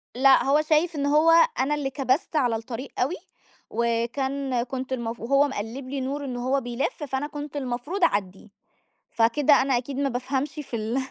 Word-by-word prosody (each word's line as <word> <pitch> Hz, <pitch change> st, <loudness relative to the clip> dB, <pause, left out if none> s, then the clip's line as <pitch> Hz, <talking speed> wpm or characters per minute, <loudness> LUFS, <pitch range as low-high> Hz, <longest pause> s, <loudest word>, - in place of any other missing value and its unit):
لأ، 270 Hz, +1 st, +5 dB
هو 285 Hz, +3 st, +3 dB
شايف 310 Hz, +2 st, +1 dB
إن 285 Hz, -1 st, -1 dB
هو 305 Hz, +3 st, +4 dB, 0.3 s
أنا 285 Hz, +3 st, +1 dB
اللي 280 Hz, -2 st, -2 dB
كبَست 270 Hz, +3 st, -1 dB
على 245 Hz, -6 st, +2 dB
الطريق 230 Hz, +4 st, -6 dB
أوي، 275 Hz, +9 st, +1 dB, 0.5 s
وكان 240 Hz, +3 st, -1 dB
كنت 260 Hz, +1 st, -5 dB
المف 235 Hz, -2 st, -4 dB
وهو 275 Hz, +5 st, +3 dB
مقلِّب 255 Hz, +2 st, -6 dB
لي 275 Hz, -1 st, -3 dB
نور 280 Hz, +2 st, -3 dB
إن 250 Hz, -2 st, -4 dB
هو 260 Hz, +3 st, 0 dB
بيلِفّ، 245 Hz, -, -3 dB
فأنا 270 Hz, +1 st, -2 dB
كنت 295 Hz, 0 st, -7 dB
المفروض 275 Hz, +8 st, -3 dB
أعدّيه 195 Hz, -, 0 dB, 0.6 s
فكده 260 Hz, +6 st, +3 dB
أنا 265 Hz, -2 st, +2 dB
أكيد 260 Hz, +2 st, -5 dB
ما 280 Hz, 0 st, +1 dB
بافهمش 265 Hz, +3 st, -2 dB
في 295 Hz, -5 st, -6 dB
ال 225 Hz, +3 st, -2 dB
265 Hz, 175 wpm, -25 LUFS, 240-285 Hz, 0.6 s, لأ